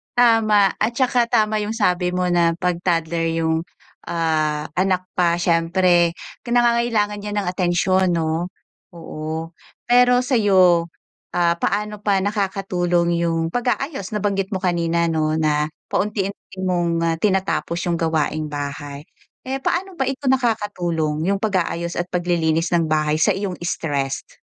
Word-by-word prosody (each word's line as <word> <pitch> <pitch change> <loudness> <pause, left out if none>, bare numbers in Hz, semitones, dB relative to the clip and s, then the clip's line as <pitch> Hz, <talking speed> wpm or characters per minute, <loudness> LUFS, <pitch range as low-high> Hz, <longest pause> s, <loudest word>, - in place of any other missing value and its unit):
Tama. 220 -5 +4
At 220 +3 +1
saka 245 -2 +2
tama 215 -2 +2
'yung 210 +2 -3
sabi 180 -4 +1
mo 180 0 0
na 170 -1 +3
'pag 180 -1 -1
toddler 165 -2 0
'yung 160 0 0 0.4
ah, 155 -2 -1
anak 185 -1 +1
pa 170 -1 +3
siyempre, 175 0 +2 0.3
ki - - -7
nangangailangan 235 -4 +2
'yan 210 0 -4
ng 185 - -5
atensyon, 180 0 +1
'no? 165 +2 -1 0.5
Oo. 160 0 -6 0.3
Pero 245 +1 +4
sa'yo, 190 -9 +4 0.5
ah, 170 -1 +2
paano 210 0 -1
pa 200 -2 +1
nakakatulong 180 -4 0
'yong 165 -1 0
pag-aayos? 245 - -2
Nabanggit 195 -2 -1
mo 185 - -4
kanina, 170 -1 +1
'no, 155 -1 0
na 150 -1 +1 0.2
paunti-unti 200 -1 -3
mong 170 -2 0
ah, 165 -1 +1
tinatapos 190 -3 0
'yong 170 -2 0
gawaing 155 -1 0
bahay. 145 0 -6 0.4
Eh, 270 +1 -2
paano 370 +1 -1
ba 265 - +1
ito 270 +1 -4
nakakatulong 175 - -1
'yung 200 0 +2
pag-aayos 175 -4 -1
at 175 - -2
paglilinis 170 -2 0
ng 165 -2 +2
bahay 155 -1 +1
sa 205 - +4
iyong 195 -2 -3
stressed? 145 -6 -3
175 Hz, 135 wpm, -21 LUFS, 165-205 Hz, 0.5 s, Tama